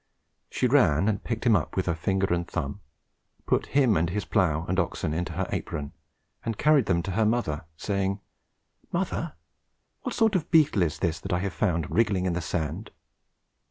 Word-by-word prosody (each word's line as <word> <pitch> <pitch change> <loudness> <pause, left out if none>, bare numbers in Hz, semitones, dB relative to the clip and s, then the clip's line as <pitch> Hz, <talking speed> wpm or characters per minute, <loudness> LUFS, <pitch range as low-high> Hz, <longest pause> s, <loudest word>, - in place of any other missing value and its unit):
She - - -1
ran 75 +7 +4
and 105 -2 0
picked 115 -1 -3
him 115 -3 +6
up 85 - -1
with 95 - 0
her 85 - +1
finger 95 +3 0
and 85 0 -1
thumb, 85 +3 -4 0.6
put - - +1
him 130 -7 +5
and 85 0 +1
his 105 +3 -2
plough 85 -6 +1
and 95 +2 0
oxen 85 -4 -1
into 85 +1 -2
her - - -2
apron, 70 -1 -4 0.5
and 115 -2 -3
carried 150 -6 +4
them 85 -3 +2
to 100 - -3
her 110 +4 +2
mother, 105 -8 0
saying, 100 0 -1 0.7
"Mother, - - -2 0.7
what - - -4
sort 220 -1 +3
of 180 -4 0
beetle 155 - +4
is 80 -3 +1
this 85 -3 -1
that 95 - -6
I 90 - +2
have 100 -1 -2
found 85 -7 0
wriggling 105 -5 +2
in 90 - +1
the 85 - -2
sand?" 80 +4 -3
95 Hz, 190 wpm, -27 LUFS, 85-110 Hz, 0.7 s, him